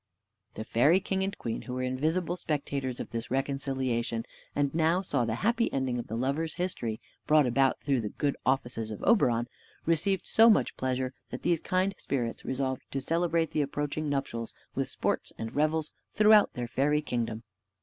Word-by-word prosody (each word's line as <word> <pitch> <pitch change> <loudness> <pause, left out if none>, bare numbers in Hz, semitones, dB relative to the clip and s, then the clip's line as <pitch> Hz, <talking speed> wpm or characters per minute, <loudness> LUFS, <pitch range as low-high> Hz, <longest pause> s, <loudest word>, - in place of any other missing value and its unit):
The 110 - -4
fairy 145 +11 +4
king 195 -1 -2
and 195 +1 -3
queen, 115 - -3
who 125 - -6
were 130 - -2
invisible 160 +7 0
spectators 140 -6 -2
of - - -6
this 115 +1 -4
reconciliation, 130 -4 -1 0.3
and 140 -1 +1
now 165 +3 +2
saw 125 -9 0
the 110 -1 -1
happy 235 +1 +2
ending 130 -2 -1
of 120 - -5
the 110 - -4
lovers' 140 +6 -1
history, 125 -12 -2 0.3
brought 150 -1 +5
about 130 +2 +2
through 135 -4 +1
the 105 - -3
good 140 +5 -1
offices 120 -4 0
of 105 - -7
Oberon, 120 - +3 0.4
received 170 +4 +1
so 225 +1 +6
much 215 - +3
pleasure, 130 0 -1 0.2
that - - -7
these 170 -2 +2
kind 185 +2 +1
spirits 120 -4 -2
resolved 130 0 -2
to 135 - -2
celebrate 165 +2 +1
the 155 - +1
approaching 145 +1 -2
nuptials 135 -5 -3 0.2
with - - -1
sports - - -1
and 110 +1 -5
revels 155 +1 +1 0.2
throughout 215 -1 +6
their 120 -1 -4
fairy 150 +5 +1
kingdom. 115 -4 -2
140 Hz, 175 wpm, -29 LUFS, 125-165 Hz, 0.4 s, so